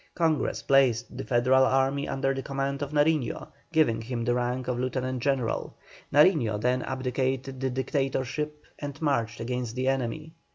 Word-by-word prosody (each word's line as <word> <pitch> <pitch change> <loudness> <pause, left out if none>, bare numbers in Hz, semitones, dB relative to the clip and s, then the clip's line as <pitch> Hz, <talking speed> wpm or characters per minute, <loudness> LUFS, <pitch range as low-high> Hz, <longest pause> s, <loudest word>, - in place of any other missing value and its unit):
Congress 160 -4 0
placed 125 -4 +3
the 135 - -4
Federal 130 +1 +4
army 135 +2 +2
under 135 0 0
the 135 - -3
command 140 +1 -3
of 145 - -2
Nariño, 150 -3 +1 0.2
giving 150 -9 +3
him 120 0 -3
the 120 - +2
rank 125 +1 -1
of 125 -1 -1
lieutenant 130 0 -2
general. 130 -3 -1 0.4
Nariño 145 - +4
then 125 +3 +1
abdicated 130 +1 -2
the 135 0 0
dictatorship 135 +3 -2 0.2
and 145 0 -6
marched 115 -8 0
against 120 0 -3
the 130 +1 -1
enemy. 135 +4 -2
130 Hz, 155 wpm, -27 LUFS, 125-140 Hz, 0.4 s, Federal